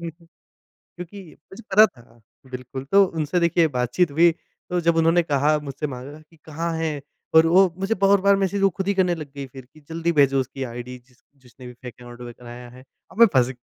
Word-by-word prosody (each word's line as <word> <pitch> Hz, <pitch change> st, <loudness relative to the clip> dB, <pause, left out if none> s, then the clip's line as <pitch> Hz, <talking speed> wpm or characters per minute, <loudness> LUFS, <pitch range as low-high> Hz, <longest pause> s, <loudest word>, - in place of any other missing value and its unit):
क्योंकि 170 Hz, 0 st, -12 dB, 1.1 s
मुझे 195 Hz, +5 st, -12 dB
पता 215 Hz, +3 st, +7 dB
था 120 Hz, -, -15 dB, 0.3 s
बिल्कुल 130 Hz, +1 st, -7 dB
तो 200 Hz, 0 st, +6 dB
उनसे 160 Hz, 0 st, -2 dB
देखिए 170 Hz, -1 st, +2 dB
बातचीत 125 Hz, +7 st, 0 dB
हुई 165 Hz, +3 st, +4 dB, 0.4 s
तो 180 Hz, -, 0 dB
जब 165 Hz, 0 st, +2 dB
उन्होंने 165 Hz, +1 st, +3 dB
कहा 150 Hz, 0 st, +1 dB
मुझसे 145 Hz, +1 st, -5 dB
माँगा 135 Hz, +3 st, -9 dB
कि 165 Hz, -, -22 dB
कहाँ 165 Hz, +2 st, -4 dB
है? 155 Hz, -3 st, -3 dB, 0.3 s
और 160 Hz, 0 st, +7 dB
वो 185 Hz, +3 st, +5 dB
मुझे 195 Hz, +4 st, -1 dB
बहुत 200 Hz, 0 st, +4 dB
बार 200 Hz, +1 st, +4 dB
मैसेज 195 Hz, +1 st, -1 dB
वो 195 Hz, -, +4 dB
ख़ुद 190 Hz, +2 st, -6 dB
ही 200 Hz, -, +2 dB
करने 185 Hz, -2 st, +1 dB
लग 150 Hz, -4 st, -9 dB
गई 140 Hz, -1 st, -6 dB
फ़िर 130 Hz, 0 st, -13 dB
कि, 135 Hz, +5 st, -21 dB
"जल्दी 165 Hz, +1 st, -1 dB
भेजो 140 Hz, -3 st, +3 dB
उसकी 130 Hz, +1 st, -4 dB
आइडी 120 Hz, +1 st, -7 dB
जिस 125 Hz, -2 st, -28 dB, 0.2 s
जिसने 125 Hz, 0 st, -14 dB
भी 125 Hz, -, -10 dB
फेक 125 Hz, 0 st, -11 dB
अकाउंट 120 Hz, 0 st, -12 dB, 0.2 s
बनाया 120 Hz, 0 st, -11 dB
है।" 125 Hz, +1 st, -15 dB, 0.3 s
और -, -, -16 dB
मैं 235 Hz, -, +9 dB
फँस 125 Hz, -3 st, +3 dB
गया 130 Hz, -, -7 dB
155 Hz, 210 wpm, -22 LUFS, 130-175 Hz, 1.1 s, मैं